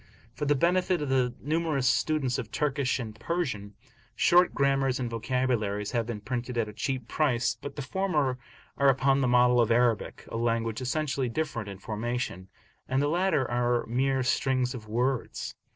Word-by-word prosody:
For 150 - -3
the 145 - +4
benefit 180 +4 +2
of 145 -2 -3
the 125 -2 +1
numerous 155 -3 0
students 135 -1 +1
of 115 -4 -5
Turkish 140 -3 0
and 115 -4 -5
Persian, 115 - -3 0.4
short 175 +1 +5
grammars 135 -2 +1
and 125 - -1
vocabularies 115 -3 -1
have 115 -2 -1
been 110 -3 -5
printed 125 +1 -4
at 115 -2 +1
a 105 - -8
cheap 125 +3 -3
price, 125 -6 +1
but 140 - -7
the 145 - -4
former 150 -6 0 0.4
are 140 0 +5
upon 135 +1 +3
the 130 - +2
model 125 0 +5
of 115 - +2
Arabic, 115 -2 +1
a - - -4
language 115 0 -1
essentially 135 -1 -1
different 115 -5 -3
in 100 - -7
formation, 110 -2 -4 0.4
and 130 +1 +1
the 145 - +2
latter 170 -5 +1
are 120 0 +1
mere 130 +3 +1
strings 130 0 +1
of 110 -4 -8
words. 125 +3 -1
130 Hz, 170 wpm, -28 LUFS, 115-140 Hz, 0.4 s, short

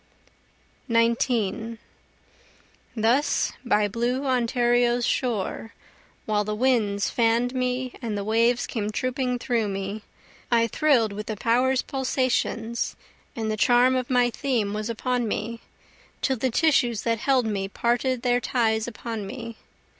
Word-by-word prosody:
19 230 -1 +1 1.2
Thus 235 +6 +2
by 210 0 +2
blue 240 +6 -1
Ontario's 240 -1 +2
shore, 225 -2 -2 0.5
While 210 -1 +1
the 210 +1 -3
winds 215 -5 +1
fann'd 235 +1 +2
me 255 0 -1
and 220 -4 -3
the 200 - -2
waves 230 +3 +2
came 210 -3 -3
trooping 255 +2 -1
toward 235 -4 -1
me, 195 +2 -4 0.5
I 230 -1 +4
thrill'd 230 -3 +2
with 210 +1 -6
the 215 - -4
power's 250 +4 +2
pulsations, 255 -3 -1 0.4
and 220 -2 -2
the - - 0
charm 245 +3 +4
of 255 -1 -2
my 245 -1 +3
theme 235 -7 -1
was 215 +1 -3
upon 245 +1 -1
me, 230 +2 -3 0.6
Till 265 -2 +1
the 260 +3 0
tissues 245 -5 +2
that 230 -1 0
held 260 -1 +2
me 200 -3 -2
parted 240 +4 0
their 245 -1 +2
ties 220 -3 0
upon 225 -3 -5
me. 230 +1 -7
235 Hz, 130 wpm, -25 LUFS, 220-250 Hz, 1.2 s, I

